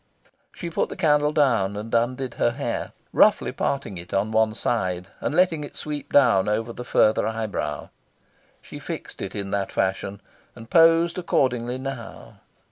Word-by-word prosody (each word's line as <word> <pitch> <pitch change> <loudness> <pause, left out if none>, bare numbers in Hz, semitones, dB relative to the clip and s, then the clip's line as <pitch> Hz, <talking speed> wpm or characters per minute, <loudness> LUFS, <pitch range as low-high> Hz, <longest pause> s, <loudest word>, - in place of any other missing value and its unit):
She 170 -2 -7
put - - 0
the - - -6
candle 150 -4 +3
down, 115 -10 +2
and 110 +2 -7
undid 125 +2 0
her - - +2
hair, 125 -3 -3 0.2
roughly - - +4
parting 135 -10 -2
it 85 +2 -7
on 100 +3 0
one 110 0 +2
side, 90 -6 -2
and - - -2
letting 170 -4 +3
it 145 - -9
sweep 150 -1 -5
down 105 -8 +4
over 110 +2 -1
the 125 - -7
further 110 -2 +3
eyebrow. 110 -2 -3 0.7
She - - -9
fixed - - -7
it 100 +1 -5
in 100 -1 -4
that 100 -1 -1
fashion, 95 +1 -1 0.4
and 115 0 -12
posed 165 +1 +5
accordingly. 125 -7 0
Now! 130 -3 -8
120 Hz, 160 wpm, -24 LUFS, 105-145 Hz, 0.7 s, posed